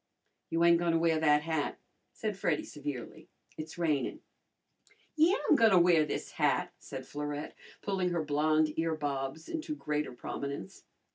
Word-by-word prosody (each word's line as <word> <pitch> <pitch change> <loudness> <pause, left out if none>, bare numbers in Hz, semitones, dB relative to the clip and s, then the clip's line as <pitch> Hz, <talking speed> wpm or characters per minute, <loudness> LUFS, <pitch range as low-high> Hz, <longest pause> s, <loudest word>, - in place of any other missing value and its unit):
"You 165 +1 +1
ain' 170 0 +7
gonna 170 -1 +2
wear 165 -1 +2
that 150 -1 +4
hat," 160 -2 -1 0.3
said 215 -2 -3
Freddy 175 -5 0
severely. 145 -5 -7 0.3
"It's 155 +1 -7
rainin'." 155 -5 0 0.9
"Yeah, 325 +5 +5
I'm - - +6
gonna 225 -7 +6
wear 170 -3 +5
this - - -4
hat," - - +1
said - - -8
Florette, 145 0 -5 0.3
pulling 190 -3 0
her 170 -2 -1
blonde 155 +1 +2
earbobs 150 -2 -2
into 315 -1 -4
greater 150 - -2
prominence. 140 -3 -6
160 Hz, 140 wpm, -31 LUFS, 150-175 Hz, 0.9 s, ain